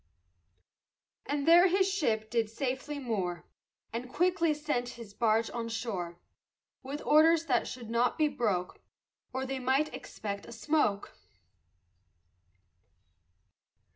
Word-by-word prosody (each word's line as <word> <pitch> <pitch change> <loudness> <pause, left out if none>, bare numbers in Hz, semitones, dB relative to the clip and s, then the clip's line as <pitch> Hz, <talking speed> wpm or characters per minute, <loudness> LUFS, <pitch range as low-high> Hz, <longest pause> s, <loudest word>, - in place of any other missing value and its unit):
And 285 0 -1
there 345 +3 +8
his 380 +1 +3
ship 225 - 0
did 230 -2 +1
safely 265 +5 -3
moor, 195 -10 -3 0.5
And 245 +2 -5
quickly 350 -1 +2
sent 295 -5 -1
his 225 -4 -10
barge 225 0 +2
on 230 -1 -4
shore, 205 -7 -4 0.6
With 280 +3 -6
orders 320 +2 +5
that 250 -6 +1
should 240 -3 -7
not 240 +1 +2
be 310 - +3
broke, 205 -10 -1 0.5
Or 260 +1 -3
they 265 0 -3
might 265 +4 +1
expect 200 -2 -6
a - - -10
smoke. 230 -4 0
250 Hz, 115 wpm, -30 LUFS, 225-300 Hz, 0.6 s, there